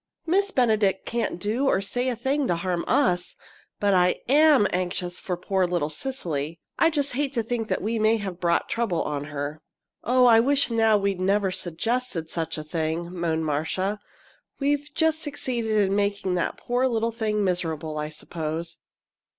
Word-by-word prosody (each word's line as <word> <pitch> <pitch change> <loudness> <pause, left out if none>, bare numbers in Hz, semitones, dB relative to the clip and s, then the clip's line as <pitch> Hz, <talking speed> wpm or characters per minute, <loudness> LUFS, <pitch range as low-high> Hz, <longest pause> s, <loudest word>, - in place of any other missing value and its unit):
Miss 390 +4 +2
Benedict 215 - +2
can't 235 -6 -2
do 225 +9 0
or 190 - +3
say 245 +6 -2
a 250 - -1
thing 265 +4 0
to 175 - +1
harm 175 0 -2
us! 180 -1 +1 0.4
But 200 -1 +2
I 180 -1 +3
am 290 -3 +6
anxious 180 0 -2
for 180 -2 -3
poor 185 +1 0
little 170 -4 -1
Cecily. 160 - -4 0.2
I 330 - +5
just 285 -3 0
hate 280 +2 -1
to 230 - +1
think 225 -1 -3
we 225 +3 -1
may 220 +1 +3
have 190 -4 -5
brought 170 -1 +1
trouble 225 -8 0
on 145 -1 -3
her." 145 +1 -5 0.4
"Oh, 250 +2 +4
I 230 -2 +7
wish 275 +2 +3
now 225 -2 +4
we'd 200 -2 -1
never 195 0 +2
suggested 185 0 -2
such 165 -1 -3
a 155 - -4
thing!" 160 +2 -3
moaned 165 -2 -1
Marcia. 185 +7 -1 0.6
"We've 290 +1 0
just 320 0 +2
succeeded 255 -6 -3
in 195 -1 +2
making 200 -2 0
that 175 -2 -1
poor 245 +2 0
little 230 -2 0
thing 215 -2 -1
miserable, 160 -4 -1
I 150 0 -3
suppose." 160 +1 -5
200 Hz, 170 wpm, -25 LUFS, 170-245 Hz, 0.6 s, I